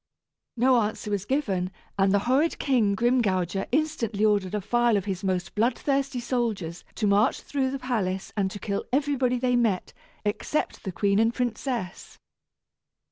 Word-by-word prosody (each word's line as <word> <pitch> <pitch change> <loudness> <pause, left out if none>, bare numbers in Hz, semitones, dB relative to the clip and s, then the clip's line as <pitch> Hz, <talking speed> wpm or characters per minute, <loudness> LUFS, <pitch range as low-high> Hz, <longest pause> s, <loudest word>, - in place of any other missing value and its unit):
No 255 +2 +4
answer 210 0 -3
was 200 -1 -1
given, 205 -9 0 0.3
and 195 -1 +3
the 200 - +4
horrid 275 +7 +2
King 230 -7 +2
Grimgouger 195 -6 +1
instantly 235 -8 0
ordered 205 -2 +1
a - - 0
file 240 +2 +2
of 195 - -2
his 195 -1 -3
most 185 -2 -1
blood 235 +3 +1
thirsty 275 -2 0
soldiers 225 -9 -2
to 215 - -1
march 205 +1 +3
through 270 -2 -1
the 275 - -3
palace 210 -8 -2
and 195 -3 +1
to 195 - -7
kill 200 0 -3
everybody 270 -2 +1
they 250 0 +1
met, 225 -7 +1 0.3
except 210 +8 -2
the 190 - -2
queen 200 +2 +1
and 225 +1 +2
princess. 240 -5 -3
220 Hz, 160 wpm, -26 LUFS, 195-255 Hz, 0.3 s, No